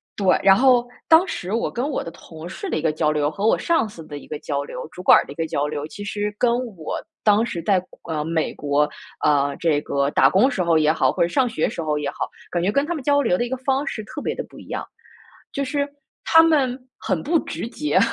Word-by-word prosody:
对， 195 Hz, -3 st, +3 dB
然 195 Hz, 0 st, +7 dB
后 245 Hz, 0 st, +4 dB, 0.2 s
当 330 Hz, +3 st, +6 dB
时 185 Hz, -, -4 dB
我 230 Hz, -, 0 dB
跟 245 Hz, +4 st, -2 dB
我 280 Hz, -, -2 dB
的 -, -, -6 dB
同 160 Hz, 0 st, -11 dB
事 375 Hz, -, -6 dB
的 -, -, -1 dB
一 -, -, -2 dB
个 160 Hz, -, +2 dB
交 155 Hz, 0 st, +1 dB
流， 150 Hz, -1 st, +1 dB
和 200 Hz, +6 st, -3 dB
我 -, -, +4 dB
上 330 Hz, -10 st, +1 dB
司 165 Hz, -6 st, -11 dB
的 145 Hz, -, -7 dB
一 -, -, -12 dB
个 150 Hz, -, -5 dB
交 140 Hz, -2 st, -2 dB
流， 140 Hz, 0 st, -7 dB
主 180 Hz, -, -9 dB
管 -, -, +8 dB
儿 -, -, +1 dB
的 -, -, -9 dB
一 -, -, -22 dB
个 165 Hz, +1 st, -2 dB
交 145 Hz, -1 st, -1 dB
流， 150 Hz, -1 st, -4 dB
其 205 Hz, -, -9 dB
实 205 Hz, 0 st, -3 dB
跟 245 Hz, -, +3 dB, 0.3 s
我 155 Hz, -, -4 dB, 0.3 s
当 210 Hz, +1 st, +4 dB
时 170 Hz, -7 st, -4 dB
在， 190 Hz, -2 st, +2 dB, 0.3 s
呃， 155 Hz, -2 st, -1 dB
美 160 Hz, 0 st, -1 dB
国， 145 Hz, 0 st, +1 dB, 0.3 s
呃， 140 Hz, -1 st, +2 dB
这 160 Hz, -3 st, +2 dB
个 140 Hz, -1 st, 0 dB
打 -, -, +5 dB
工 215 Hz, +8 st, +4 dB
时 190 Hz, -9 st, -1 dB
候 170 Hz, -2 st, +3 dB
也 155 Hz, 0 st, +4 dB
好， 160 Hz, -, +2 dB
或 -, -, -3 dB
者 -, -, +2 dB
上 260 Hz, +7 st, +2 dB
学 190 Hz, -9 st, -1 dB
时 165 Hz, -, -5 dB
候 150 Hz, -1 st, -1 dB
也 145 Hz, -, -2 dB
好， -, -, -4 dB, 0.2 s
感 175 Hz, -, 0 dB
觉 195 Hz, -, +2 dB
跟 280 Hz, +5 st, +1 dB
他 345 Hz, -, -2 dB
们 295 Hz, -, -6 dB
交 285 Hz, +1 st, +3 dB
流 185 Hz, -9 st, +2 dB
的 240 Hz, -, 0 dB
一 240 Hz, -, -6 dB
个 260 Hz, -, -1 dB
方 270 Hz, +2 st, 0 dB
式 215 Hz, -, -4 dB
特 295 Hz, -, -7 dB
别 -, -, -2 dB
地 -, -, -4 dB
不 -, -, -13 dB
一 -, -, -13 dB
样。 -, -, -4 dB, 0.7 s
就 280 Hz, -, -1 dB
是 285 Hz, +1 st, -1 dB, 0.4 s
他 325 Hz, -1 st, +7 dB
们 275 Hz, -6 st, +2 dB, 0.2 s
很 -, -, -1 dB
不 330 Hz, +4 st, +2 dB
直接， 300 Hz, +6 st, -2 dB
195 Hz, 285 characters per minute, -22 LUFS, -, 0.7 s, 管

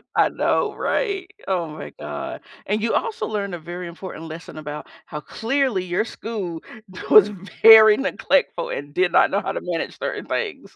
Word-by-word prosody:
I -, -, +4 dB
know, 435 Hz, -4 st, 0 dB
right? 390 Hz, -5 st, -1 dB, 0.2 s
Oh 180 Hz, -4 st, 0 dB
my 155 Hz, 0 st, -8 dB
god. 75 Hz, -1 st, -6 dB, 0.2 s
And 210 Hz, +2 st, -1 dB
you 230 Hz, -, 0 dB
also 460 Hz, -2 st, -2 dB
learned 200 Hz, -3 st, -3 dB
a 175 Hz, -, -5 dB
very 175 Hz, +2 st, -7 dB
important 170 Hz, -1 st, -8 dB
lesson 160 Hz, 0 st, -9 dB
about 150 Hz, -1 st, -7 dB, 0.2 s
how 150 Hz, -, -6 dB
clearly 235 Hz, -, -1 dB
your 180 Hz, +5 st, -1 dB
school 195 Hz, -9 st, -5 dB, 0.5 s
was 210 Hz, -1 st, +8 dB, 0.3 s
very 220 Hz, -1 st, +9 dB
neglectful 270 Hz, -9 st, 0 dB
and 145 Hz, +1 st, -6 dB
did 180 Hz, -1 st, +2 dB
not -, -, +5 dB
know 200 Hz, +2 st, 0 dB
how -, -, -3 dB
to -, -, -4 dB
manage 175 Hz, -2 st, -4 dB
certain -, -, -4 dB
things. 455 Hz, -3 st, -4 dB
190 Hz, 175 wpm, -22 LUFS, 165-225 Hz, 0.5 s, very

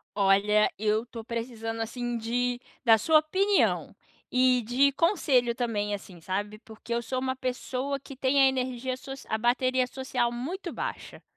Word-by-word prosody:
Olha, 205 Hz, +1 st, +4 dB
eu 215 Hz, +2 st, +1 dB
tô 230 Hz, -1 st, -8 dB
precisando, 225 Hz, -1 st, -4 dB
assim, 240 Hz, +1 st, -3 dB
de 245 Hz, +2 st, -1 dB, 0.2 s
da 225 Hz, -2 st, +6 dB
sua 315 Hz, +8 st, +5 dB
opinião 380 Hz, +6 st, +1 dB, 0.4 s
e 250 Hz, 0 st, +4 dB
de 250 Hz, +5 st, +3 dB
conselho 275 Hz, -, +2 dB
também, 210 Hz, -4 st, -1 dB
assim, 185 Hz, -3 st, -12 dB
sabe. 205 Hz, +4 st, -3 dB
Porque 225 Hz, +2 st, -8 dB
eu 235 Hz, -, 0 dB
sou 255 Hz, +3 st, -3 dB
uma 260 Hz, 0 st, -1 dB
pessoa 260 Hz, +2 st, -3 dB
que 275 Hz, 0 st, -11 dB
tem 265 Hz, +1 st, +2 dB
a 270 Hz, -, +7 dB
energia 255 Hz, -1 st, -1 dB
soci 270 Hz, +1 st, -9 dB
a 220 Hz, -, 0 dB
bateria 255 Hz, +2 st, +2 dB
social 255 Hz, -2 st, -1 dB
muito 335 Hz, +10 st, -5 dB
baixa. -, -, -6 dB
245 Hz, 160 wpm, -28 LUFS, 225-265 Hz, 0.4 s, a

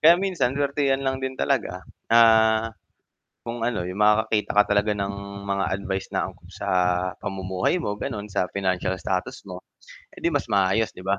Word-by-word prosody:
kaya 165 Hz, +2 st, +8 dB
minsan 180 Hz, -9 st, 0 dB
suwertehan 140 Hz, -1 st, +1 dB
lang 130 Hz, 0 st, -1 dB
din 130 Hz, 0 st, -4 dB
talaga. -, -, -1 dB, 0.2 s
Ah, 110 Hz, -1 st, +5 dB, 0.7 s
kung 115 Hz, 0 st, -4 dB
ano, 110 Hz, -7 st, -1 dB
yung 90 Hz, +3 st, -5 dB
makakakita 105 Hz, 0 st, +3 dB
ka 105 Hz, -, +9 dB
talaga 105 Hz, +1 st, +2 dB
ng 100 Hz, 0 st, -2 dB, 0.3 s
mga 100 Hz, -1 st, 0 dB
advice 95 Hz, -1 st, -4 dB
na -, -, 0 dB
angkop -, -, -13 dB
sa -, -, -6 dB, 0.5 s
pamumuhay 95 Hz, -, -1 dB
mo 105 Hz, -, -2 dB
gano’n, 105 Hz, -1 st, -5 dB
sa 100 Hz, -3 st, -1 dB
financial 95 Hz, -1 st, -1 dB
status 95 Hz, +10 st, -3 dB
mo, 90 Hz, 0 st, -8 dB, 0.5 s
edi 340 Hz, -2 st, 0 dB
mas -, -, 0 dB
maayos, 100 Hz, +1 st, +2 dB
'di 90 Hz, -, -9 dB
ba? 100 Hz, +1 st, +1 dB
105 Hz, 165 wpm, -24 LUFS, 95-130 Hz, 0.7 s, ka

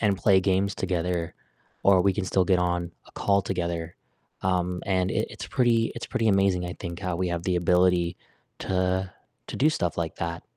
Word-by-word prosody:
and 100 Hz, -3 st, +2 dB
play 95 Hz, +1 st, +4 dB
games 95 Hz, +1 st, +1 dB
together, 90 Hz, -2 st, -2 dB, 0.5 s
or 95 Hz, -2 st, +5 dB
we 100 Hz, -, +3 dB
can 95 Hz, 0 st, -2 dB
still 95 Hz, 0 st, +2 dB
get 90 Hz, 0 st, +3 dB
on 90 Hz, -1 st, -1 dB
a -, -, -18 dB
call 100 Hz, 0 st, +2 dB
together, 85 Hz, -3 st, -3 dB, 0.5 s
um, 90 Hz, -1 st, 0 dB
and 95 Hz, -1 st, +1 dB
it -, -, 0 dB
it's -, -, -7 dB
pretty 120 Hz, -4 st, +2 dB
it's 115 Hz, -, -6 dB
pretty 115 Hz, -1 st, 0 dB
amazing, 95 Hz, -2 st, +2 dB
I 90 Hz, -, -5 dB
think, 85 Hz, 0 st, -6 dB
how 90 Hz, -3 st, -2 dB
we 90 Hz, 0 st, -1 dB
have 85 Hz, -1 st, -2 dB
the 90 Hz, -2 st, +1 dB
ability 90 Hz, 0 st, +2 dB, 0.4 s
to 95 Hz, 0 st, 0 dB, 0.4 s
to -, -, -5 dB
do 150 Hz, +4 st, +4 dB
stuff 85 Hz, -, -2 dB
like 80 Hz, -1 st, -3 dB
that. 85 Hz, 0 st, -4 dB
90 Hz, 195 wpm, -26 LUFS, 85-95 Hz, 0.5 s, or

